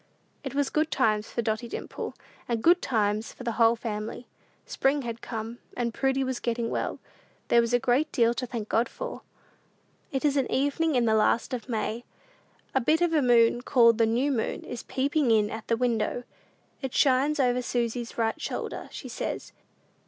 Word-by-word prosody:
It 270 -1 -5
was 285 -1 +1
good 310 +1 +1
times 215 -5 +1
for 235 - -2
Dotty 220 +2 -1
Dimple, - - -6 0.3
and 230 -2 -1
good 350 +2 +5
times 215 -2 0
for - - -10
the 235 - -1
whole 230 +1 +4
family. 220 0 -5 0.4
Spring 275 +1 +1
had 230 -1 -5
come, 225 0 -5 0.2
and 235 -2 -1
Prudy 270 +2 +1
was 260 -1 -2
getting 235 -1 -2
well. - - -2 0.5
There 235 - +6
was 235 0 -1
a 245 - +5
great 255 +5 +1
deal 235 -1 +3
to 250 +1 -4
thank 230 -3 -5
God 230 +3 +1
for! - - -6 0.9
It 270 0 -1
is 290 -1 +2
an 270 - 0
evening 285 +3 +1
in 245 -2 +3
the 220 - +3
last 220 +4 +2
of 250 0 -5
May. 225 0 -2 0.7
A 265 - +2
bit 315 +7 +2
of 345 -1 +2
a 305 - +4
moon, 240 -1 +4
called 235 -3 +4
"the 225 - +4
new 250 +6 +1
moon," 235 -5 -2
is 240 - -6
peeping 280 0 0
in 215 -2 +3
at 220 -1 -7
the 230 - +1
window. 240 0 0 0.6
It 265 -3 -4
shines 280 +2 +3
over 250 -1 +2
Susy's 240 -1 -2
right 225 -1 0
shoulder, - - -4
she - - -7
says. - - -4
240 Hz, 190 wpm, -27 LUFS, 230-270 Hz, 0.9 s, There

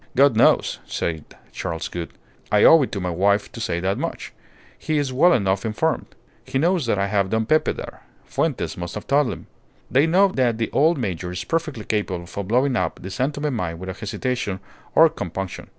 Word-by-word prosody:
"God 140 -2 +5
knows!" 115 - +3
said 80 -3 -3 0.3
Charles 80 0 -4
Gould. 85 -1 -5 0.4
"I 105 - +4
owed 160 -4 +7
it - - -13
to 100 - -2
my 90 -1 -2
wife 100 +4 +1
to - - -9
say 85 -6 -1
that 95 +2 -1
much. - - -5 0.5
He 155 - -1
is 140 -3 -1
well 170 +8 +5
enough 95 - +1
informed. 115 +9 -1 0.4
He - - -3
knows 170 -1 +1
that 110 - +1
I 100 - +1
have 100 -1 0
Don 110 +1 0
Pepe 155 +6 +2
there. - - -9 0.2
Fuentes - - -2
must 85 -1 -6
have 105 - -6
told 145 0 +3
him. - - -8 0.5
They 140 +5 +4
know 190 +4 +5
that 125 -8 +1
the 115 - -2
old 160 +4 +3
major 90 -8 -3
is 90 - -4
perfectly 155 -9 -2
capable 100 -5 -2
of 95 +2 -6
blowing 125 +4 +2
up 90 -7 -1
the 95 - -6
San 130 +9 0
Tome 145 -1 -3
mine 85 -7 -3
without 95 +1 -7
hesitation 110 -3 -3 0.4
or 165 - +8
compunction. 95 - -6
110 Hz, 200 wpm, -22 LUFS, 95-140 Hz, 0.5 s, or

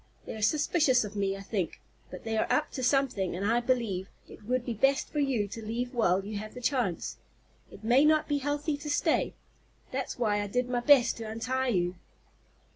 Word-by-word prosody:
They - - -6
are 220 - -7
suspicious 290 0 +3
of 210 0 -7
me, 195 -1 0
I - - -8
think. 195 -4 -3 0.3
But 185 - -9
they 225 -1 -2
are 220 - 0
up 305 - +1
to 260 - -5
something, 250 -9 +1
and 190 +3 -3
I 230 +3 +3
believe, 230 -7 -1 0.2
it - - -13
would 250 +1 0
be 240 - -2
best 270 +6 +1
for 300 - -2
you 260 -8 +1
to 225 +3 -7
leave 240 +4 -3
while 195 -5 +2
you 210 0 -4
have 215 +2 -8
the - - -6
chance. 245 -8 -1 0.5
It - - -14
may 245 +5 +5
not 310 0 +4
be 290 -1 +1
healthy 290 +2 -1
to 295 +1 -7
stay. 290 - +1 0.6
That's 260 0 -3
why 210 -4 +1
I 205 - -3
did 250 +5 0
my 250 -1 0
best 255 0 +5
to 225 - -6
untie 255 +4 -1
you." 180 -5 0
240 Hz, 210 wpm, -29 LUFS, 205-270 Hz, 0.6 s, may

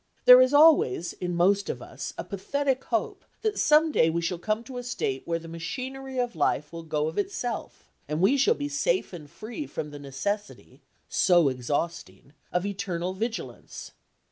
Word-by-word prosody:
There 250 0 +10
is 255 +1 +4
always 290 - +5
in 175 -1 -4
most 195 +4 +2
of - - -3
us - - -7
a - - -3
pathetic 265 +6 -2
hope - - -2 0.2
that 435 -1 0
some 310 +1 +4
day 160 - +3
we 165 +1 0
shall 170 0 -2
come 215 +5 -1
to 250 +1 -7
a - - -6
state 135 - -3
where 165 0 0
the 165 0 -10
machinery 260 +11 -6
of 245 -5 -1
life 150 0 0
will 165 - -6
go 155 -2 -1
of 160 - -3
itself 370 -12 -4 0.2
and 150 +2 -2
we 195 +10 +4
shall 410 - +3
be 290 - -3
safe 305 - 0
and 155 -4 -9
free 240 - -7
from 150 - -5
the 145 - -9
necessity—so 175 +1 -1
exhausting—of 145 - -4
eternal 185 -3 -3
vigilance. 225 +4 -6
195 Hz, 170 wpm, -27 LUFS, 165-260 Hz, 0.2 s, There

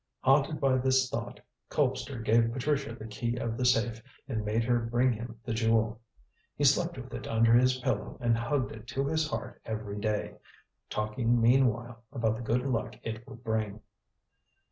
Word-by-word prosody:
Haunted 140 +3 +3
by 135 -2 +3
this 130 0 +3
thought, - - -4 0.3
Colpster 115 -5 -1
gave 115 +1 +4
Patricia 140 0 -1
the 110 - -9
key 115 +2 -3
of 115 -1 -2
the 125 - -1
safe 115 -2 +2 0.3
and 110 -6 -2
made 110 +2 +1
her 120 +1 +2
bring 120 +2 +2
him 115 0 -7
the 115 - -2
Jewel. 110 0 +1 0.5
He - - -2
slept - - +3
with - - -8
it - - -5
under 115 0 +4
his 125 +2 +5
pillow 125 - -2
and 120 -1 +2
hugged 130 +3 -1
it 120 - -10
to 135 +3 -1
his 155 +1 0
heart - - -5
every 105 -2 -4
day, 105 0 -2 0.5
talking 115 +3 +1
meanwhile 120 -1 +2
about 115 -5 0
the 115 - -6
good 120 +2 0
luck 125 -4 -1
it 115 +1 -5
would 120 - -11
bring. 110 -2 -1
115 Hz, 175 wpm, -30 LUFS, 110-130 Hz, 0.5 s, his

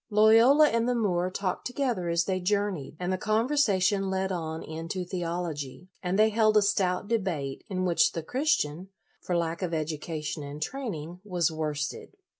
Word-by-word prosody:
Loyola 225 +8 +6
and 230 +1 +1
the 250 - +1
Moor 185 -6 +1
talked 185 -1 -3
to 250 - -9
gether 240 -11 -1
as 170 0 +2
they 185 -1 -1
journeyed, 195 -6 -1
and 180 +1 -1
the 185 - -2
conver 220 +6 +1
sation 200 -8 +2
led 190 0 -1
on 160 -3 -4
into 165 +3 -5
theology, 175 -3 -4
and 180 +1 -1
they 215 +1 +5
held 215 0 +3
a 210 - +5
stout 185 -1 +1
debate, 175 -12 -2
in 185 -1 -1
which 175 -2 +3
the 165 - -4
Christian, 190 - 0 0.3
for 175 - -1
lack 170 +1 -2
of 175 -3 -1
education 155 -1 -3
and 145 +1 -7
training, 180 - -5
was 180 -6 0
worsted. 155 - -4
185 Hz, 175 wpm, -28 LUFS, 165-210 Hz, 0.3 s, Loyola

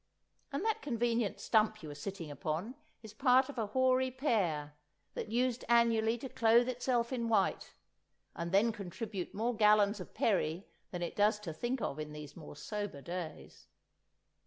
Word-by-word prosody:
And 285 +9 -2
that 445 -1 0
convenient 235 -5 0
stump 215 -2 +2
you 150 - -6
are - - -6
sitting 165 +1 -6
upon 165 - -3 0.3
is 220 -1 -10
part 260 +3 +4
of 270 -4 -6
a 220 - 0
hoary 260 +3 +2
pear, 190 - 0 0.4
that - - -5
used 245 +1 +1
annually 230 -1 +4
to 265 - -6
clothe 235 +1 +4
itself 245 -1 0
in 235 -2 -1
white—and 190 -4 -3
then 205 +4 +4
contribute 200 -1 -6
more 230 +3 0
gallons 210 -1 +4
of 180 - -9
perry 180 -3 +1 0.2
than 175 -1 -4
it 170 - -4
does 210 +1 +3
to 170 -6 -5
think 240 +9 -2
of 140 - -3
in 150 0 -5
these 150 -1 -9
more 155 -3 -10
sober 205 -3 -5
days! 175 -2 -7
215 Hz, 160 wpm, -33 LUFS, 180-240 Hz, 0.4 s, part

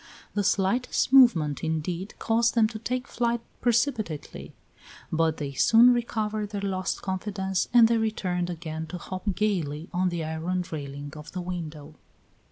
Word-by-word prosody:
The 205 - 0
slightest 200 +7 +1
movement, 170 - +5
indeed, 165 +4 -3
caused 230 +1 +1
them 225 -2 +5
to 220 -1 -7
take 250 +3 -3
flight 235 0 0 0.2
precipitately; 230 - -1 0.6
but 160 -1 +1
they 145 -2 -4
soon 225 - +6
recovered 215 -3 -2
their 205 -1 -4
lost 185 -2 -2
confidence 190 -1 -2
and 235 -2 +7
they 230 0 +2
returned 180 -5 -1
again 160 -2 -5
to 180 - -6
hop 185 +2 -4
gayly 170 -7 -1
on 180 +1 +1
the 170 -2 -3
iron 165 +3 -2
railing 145 -1 -6
of 150 0 -10
the 180 - -3
window. 160 -4 -6
185 Hz, 150 wpm, -26 LUFS, 160-220 Hz, 0.6 s, and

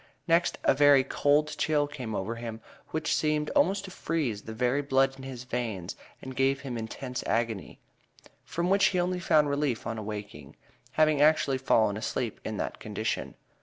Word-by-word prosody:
Next 170 +1 +3
a - - +5
very 140 -1 +6
"cold 145 +3 +1
chill" 150 -2 +2
came 130 -7 -6
over 100 +4 -2
him, 115 -1 -6 0.3
which 155 -1 -1
seemed 150 -1 0
almost 195 +2 +2
to 190 - -9
freeze 150 - -2
the 110 - -8
very 125 +4 +1
blood 135 -1 +2
in 135 - -12
his 130 -2 -7
veins 115 -7 -4 0.3
and 130 -1 -7
gave 135 +1 +2
him 135 -3 -5
intense 125 +3 -5
agony, 115 -3 -2 0.6
from 175 +2 -2
which 200 0 +5
he 185 - +2
only 180 +1 0
found 155 -3 +3
relief 140 -4 -1
on 115 -1 -3
awaking, 105 -9 -7 0.4
having 155 -2 +3
actually 145 -3 +4
fallen 110 -5 +2
asleep 110 +1 -3
in 110 - -4
that - - -4
condition. 110 +1 -3
135 Hz, 170 wpm, -28 LUFS, 115-150 Hz, 0.6 s, very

